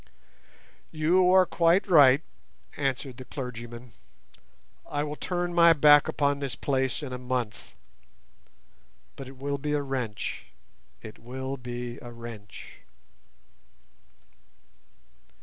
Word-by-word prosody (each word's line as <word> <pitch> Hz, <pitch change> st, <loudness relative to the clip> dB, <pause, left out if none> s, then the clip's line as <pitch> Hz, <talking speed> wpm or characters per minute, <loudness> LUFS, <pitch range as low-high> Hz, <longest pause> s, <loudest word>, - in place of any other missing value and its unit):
"You 175 Hz, +4 st, +3 dB
are 185 Hz, 0 st, +6 dB
quite 170 Hz, +3 st, +2 dB
right," 145 Hz, -5 st, +6 dB, 0.5 s
answered 135 Hz, -2 st, -3 dB
the 130 Hz, -, -9 dB
clergyman. 120 Hz, -2 st, -8 dB, 1.0 s
"I 145 Hz, 0 st, -1 dB
will 150 Hz, 0 st, -4 dB
turn 175 Hz, +1 st, -3 dB
my 170 Hz, -1 st, +7 dB
back 145 Hz, -1 st, +6 dB
upon 140 Hz, -1 st, 0 dB
this 140 Hz, -3 st, -3 dB
place 135 Hz, +1 st, -1 dB
in 130 Hz, -3 st, -6 dB
a 125 Hz, -, -5 dB
month. 125 Hz, -4 st, -4 dB, 1.4 s
But 135 Hz, -, -9 dB
it 135 Hz, 0 st, -12 dB
will 140 Hz, +1 st, -3 dB
be 150 Hz, +2 st, -2 dB
a 145 Hz, -, +1 dB
wrench, 125 Hz, -6 st, -4 dB, 0.6 s
it 110 Hz, -, -10 dB
will 130 Hz, +3 st, -5 dB
be 120 Hz, -1 st, -6 dB
a 120 Hz, -, -9 dB
wrench." 115 Hz, -3 st, -10 dB
135 Hz, 115 wpm, -27 LUFS, 125-150 Hz, 1.4 s, my